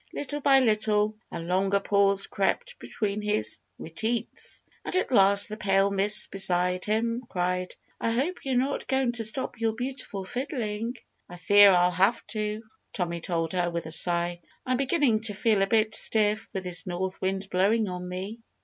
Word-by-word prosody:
Little 290 +1 -4
by 270 -1 +5
little 215 -2 +1 0.2
a - - -5
longer 190 +4 0
pause 200 -1 +1
crept - - -2
between 210 -1 -3
his 160 - 0 0.2
re 160 - -9
teats. 220 +7 -3 0.2
And - - -5
at 370 - 0
last 200 -3 +5
the 215 - -6
pale 195 -1 +2
miss 200 +2 +5
beside 180 -1 +1
him 230 +3 -1
cried, 180 0 -2 0.2
"I - - -1
hope 275 +11 -1
you're 265 -2 -2
not 270 +3 -1
going 265 -2 +1
to 235 -1 -3
stop 230 +2 -1
your 225 -1 +1
beautiful 245 -5 -5
fiddling!" 235 -1 -4 0.3
"I 175 - -10
fear 205 +3 +6
I'll 180 -1 +4
have 195 +6 +1
to," 215 0 -3 0.3
Tommy 170 -2 -3
told 165 -1 -2
her 175 -1 0
with 170 -1 -4
a 160 - -7
sigh. 175 +1 0 0.2
"I'm 255 -1 0
beginning 270 -5 +1
to 205 -2 +1
feel 210 -1 +1
a 195 - +2
bit 215 0 +1
stiff, 215 0 +2
with 190 - -4
this 180 -2 -1
north 185 +1 -4
wind 190 +1 -2
blowing 205 +4 +2
on 180 -1 -6
me." 190 +5 -6
205 Hz, 175 wpm, -26 LUFS, 185-230 Hz, 0.3 s, fear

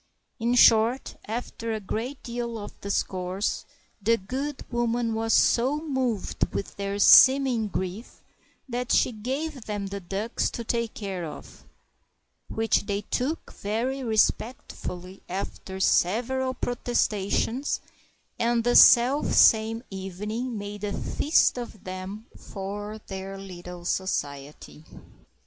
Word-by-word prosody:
In 235 +2 +1
short, 235 +1 +5
after 230 0 -4
a 220 - -2
great 230 +7 -5
deal 235 -1 -4
of 205 - -9
discourse, 190 0 -2 0.4
the 230 +3 +3
good 265 +8 -5
woman 240 -1 0
was 225 0 -1
so 255 +6 +4
moved 265 - -1
with 200 - -4
their 200 0 -3
seeming 260 0 +7
grief 190 +3 -5 0.4
that 250 -1 -3
she - - +4
gave 265 +4 -4
them 205 -2 -3
the 200 +1 -5
ducks 200 +5 -2
to 235 - -6
take 235 0 -2
care 195 -4 -4
of; 155 - -9 0.8
which 225 -2 0
they 200 -1 -1
took 260 +9 -3
very 245 +6 -2
respectfully 215 -5 -1
after 190 0 -5
several 250 +8 +1
protestations, 240 +1 0 0.6
and 235 0 +2
the 245 +1 +2
selfsame 235 -3 +6
evening 210 +6 -4
made 205 0 -7
a 205 -1 -2
feast 295 -4 +2
of 235 -4 -8
them 185 +4 -7
for 205 +2 -6
their 195 0 -6
little 180 -2 -9
society. 150 -5 -3
220 Hz, 115 wpm, -26 LUFS, 195-245 Hz, 0.8 s, seeming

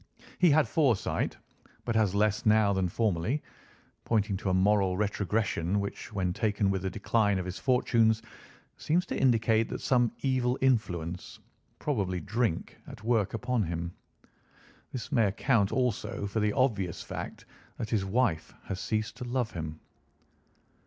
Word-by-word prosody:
He 180 - +6
had 155 +1 +4
foresight, 135 - +1 0.5
but 120 - -1
has 105 -3 +2
less 105 +1 +2
now 105 -2 +4
than 95 -2 0
formerly, 110 - 0 0.6
pointing 105 -3 +1
to 95 - -2
a - - +1
moral 95 -1 +3
retrogression, 100 -2 0
which, 100 +2 -5
when 95 -4 -1
taken 105 -2 +1
with 95 -1 -1
the 95 - -2
decline 105 +1 +1
of 90 - -3
his 90 -1 -5
fortunes, 115 -3 +2 0.5
seems 175 +4 +1
to - - -4
indicate 115 -3 +2
some 120 -3 +2
evil 130 -2 +1
influence, 90 -10 -1 0.4
probably 100 -11 -1
drink, 105 -2 -2
at - - -10
work 115 -3 +1
upon 125 0 0
him. 85 +1 -4 1.0
This 125 - -6
may 115 -3 +4
account 100 0 +2
also 125 -5 -1
for 100 +2 -2
the 105 -1 +1
obvious 105 -10 0
fact - - -7 0.3
that 110 -3 -5
his 105 -4 +1
wife 95 -5 0
has 100 -1 -5
ceased 110 +1 -2
to 125 - -6
love 120 -2 -1
him." 80 -2 -6
105 Hz, 145 wpm, -29 LUFS, 95-120 Hz, 1.0 s, He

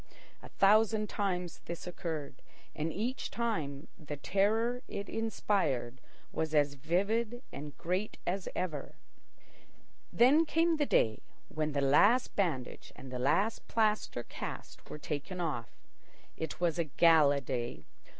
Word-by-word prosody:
A - - -11
thousand 215 +1 +4
times 180 -4 -2
this 170 0 -6
occurred, 160 -6 -5 0.3
and 155 +2 -2
each 235 +8 -3
time 160 -12 -2
the 150 -1 -6
terror 220 - +1
it 200 0 -5
inspired 165 - -1 0.3
was 160 -1 -2
as 145 -1 +3
vivid 205 - 0
and 145 0 -8
great 185 +5 -2
as 185 +1 -2
ever. 155 -6 -3 1.2
Then 275 +7 +6
came 330 +1 +2
the 295 -2 +1
day 110 -1 +2 0.3
when 155 -1 -2
the 140 - +1
last 200 - +4
bandage 155 -11 -2
and 130 - -10
the 125 - -4
last 170 - +1
plaster 215 - +1
cast - - -8
were - - -6
taken 150 +5 -5
off. 145 -10 -2 0.7
It 160 -2 -5
was 175 -1 +1
a 170 - +2
gala 150 -1 +5
day. 120 - -4
170 Hz, 130 wpm, -32 LUFS, 145-215 Hz, 1.2 s, Then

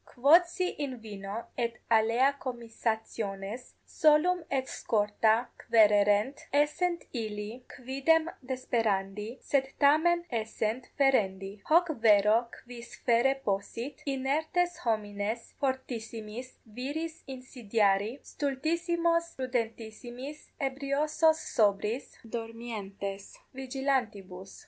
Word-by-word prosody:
Quodsi 340 +7 +3
in 275 -4 -3
vino 200 -2 -7 0.2
et 235 -1 -1 0.2
alea 235 +5 +3
comissationes 225 -3 -4
solum 320 +3 +3
et 265 -1 0
scorta 220 +2 +1
quaererent, 210 +2 +4
essent 340 +5 +1
illi 220 0 -5
quidem 275 +6 +2 0.2
desperandi, 225 -4 -1
sed 270 -2 +1
tamen 320 +4 +4
essent 225 +1 -2
ferendi: 200 -7 +1
hoc 340 +2 +5
vero 215 +2 +5 0.2
quis 240 -1 -10
ferre 245 +3 +4
possit, 205 +6 -3
inertes 310 +6 0
homines 215 0 -2
fortissimis 245 -3 -4
viris 285 +9 -5
insidiari, 230 -4 0
stultissimos 335 +4 0
prudentissimis, 245 +2 -5
ebriosos 290 +3 +1 0.2
sobriis, 210 +2 +1 0.2
dormientes 205 -4 -6 0.2
vigilantibus? 250 -9 -3
245 Hz, 85 wpm, -30 LUFS, 215-280 Hz, 0.2 s, hoc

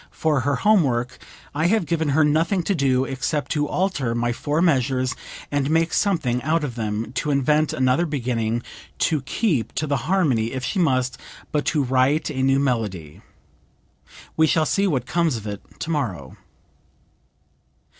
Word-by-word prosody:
For 155 -3 0
her 140 +3 0
home 210 +7 +4
work 125 -3 -1 0.3
I 155 +4 +1
have 215 -1 +2
given 160 -2 0
her 150 +3 +3
nothing 165 +5 +2
to 200 - 0
do 135 -5 +2
except 135 +2 -2
to 150 -1 0
alter 150 -10 -1
my 120 0 0
four 150 +5 -2
measures 130 -6 +2 0.4
and 145 -1 0
make 165 +1 +2
something 135 -12 +1
out 160 +3 0
of 135 -5 -3
them, 110 0 -3
to 150 - -2
invent 150 +2 +2
another 130 +6 +1
beginning, 120 -5 -1 0.3
to 155 -3 +1
keep 135 - -1
to 155 - -1
the 140 -2 0
harmony 135 -12 +1
if 130 -1 -4
she 190 - -1
must, 130 -6 +1 0.3
but 150 -2 0
to 150 -3 +1
write 130 +4 +1
a 130 - -3
new 135 0 +3
melody. 105 - -2 1.1
We 160 0 +4
shall 155 0 +2
see 200 +5 +1
what 130 -8 0
comes 165 -3 0
of 110 - -9
it 100 -1 -5 0.2
tomorrow." 120 - -3
140 Hz, 165 wpm, -22 LUFS, 125-160 Hz, 1.1 s, home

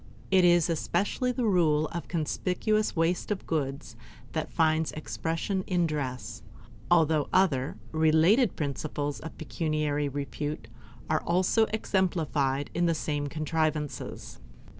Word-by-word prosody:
It 190 -1 +5
is 175 -2 +5
especially 190 - 0
the 250 -1 -1
rule 160 -7 +3
of 170 - -4
the - - -22
conspicuous 185 +6 0
waste 165 +2 0
of 205 -2 -2
goods 140 -4 -3 0.4
that 155 -1 -3
finds 160 -1 +2
expression 165 +5 -2
in 175 -2 +2
dress, 140 -5 -4 0.5
although 160 -4 +4
the - - +1
other, 145 -9 +1
related 160 +9 +4
principles 145 0 -3
of 160 - -9
pecuniary 150 -2 -1
repute 145 -1 -4 0.4
are 155 0 +1
also 185 +6 +2
exemplified 155 - 0
in 175 +1 +1
the 165 - +2
same 145 -1 -2
contrivances. 155 0 -3
160 Hz, 125 wpm, -28 LUFS, 150-180 Hz, 0.5 s, It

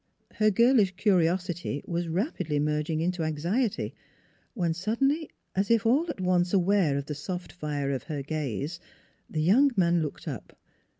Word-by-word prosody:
Her 215 -1 +3
girlish 215 -3 +4
curiosity 175 -5 +1
was 170 0 -2
rapidly 170 - -1
merging 150 +2 0
into 180 +1 -1
anxiety, 170 - -1 0.6
when 175 -6 0
suddenly, 270 - 0 0.3
as 195 +3 +1
if 230 -1 +3
all 285 +9 +3
at 310 - -4
once 180 0 +2
aware 185 -6 +3
of 140 - -3
the 150 - -4
soft 180 +5 -5
fire 145 -5 -3
of 135 -3 -2
her 145 -3 -4
gaze, 150 - -3 0.5
the 155 -1 -1
young 245 - +5
man 170 -2 +3
looked 150 -2 -5
up. - - -7
175 Hz, 155 wpm, -28 LUFS, 155-205 Hz, 0.6 s, young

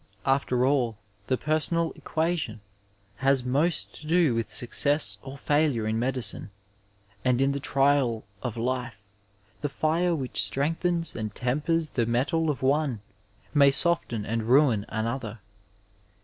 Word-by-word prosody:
After 135 -2 +1
all, 125 -6 +1 0.3
the 130 - +1
personal 160 +3 +1
equation 160 -9 -2 0.6
has 135 -1 +2
most 145 +7 0
to 155 - -9
do 165 -5 +3
with 115 0 -2
success 120 -3 +3
or 135 +1 -9
faulure 145 -6 +1
in 110 +1 -1
medicine, 125 -3 -1 0.7
and 125 -1 +2
in 135 +1 +2
the 140 - -2
trials 135 -4 +1 0.2
of 120 -3 -4
life 115 -4 -4 0.5
the 145 - -1
fire 165 +4 0
which 130 -5 -2
strengthens 165 +4 -1
and 110 -2 -5
tempers 150 +6 0
the 115 -3 -1
metal 155 +7 0
of 140 -3 -3
one 135 -4 +1 0.5
may 140 -2 +6
soften 140 -7 +1
and 115 +1 -1
ruin 125 -4 +3
another. 115 0 -3
135 Hz, 135 wpm, -26 LUFS, 120-155 Hz, 0.7 s, may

